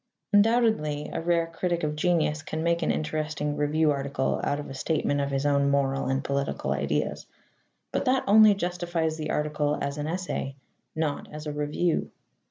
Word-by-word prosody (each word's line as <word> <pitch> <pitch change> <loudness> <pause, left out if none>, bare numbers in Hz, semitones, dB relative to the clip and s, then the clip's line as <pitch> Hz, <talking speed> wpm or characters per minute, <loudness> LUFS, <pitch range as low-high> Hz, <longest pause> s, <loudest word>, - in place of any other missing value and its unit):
Undoubtedly 205 -9 +3
a - - -2
rare 170 0 +2
critic 170 +1 -2
of 150 0 -1
genius 155 -2 +1
can 155 0 -4
make 170 0 +1
an - - 0
interesting 150 -1 -1
review 150 +1 +2
article 140 -1 -1
out 145 - 0
of 145 - -6
a - - -7
statement 145 0 0
of 140 - -1
his 135 0 -1
own 140 -1 +3
moral 135 -1 +1
and 135 +1 0
political 140 0 -2
ideas. - - -1 0.6
But - - -1
that 260 0 +2
only 215 0 +7
justifies 175 -3 -1
the 155 -1 -4
article 150 -1 0
as 140 +1 -3
an 145 - -2
essay, 170 -5 -3 0.4
not 155 -2 -2
as 150 0 -8
a 150 - -3
review. 150 +3 0
150 Hz, 175 wpm, -27 LUFS, 145-170 Hz, 0.6 s, only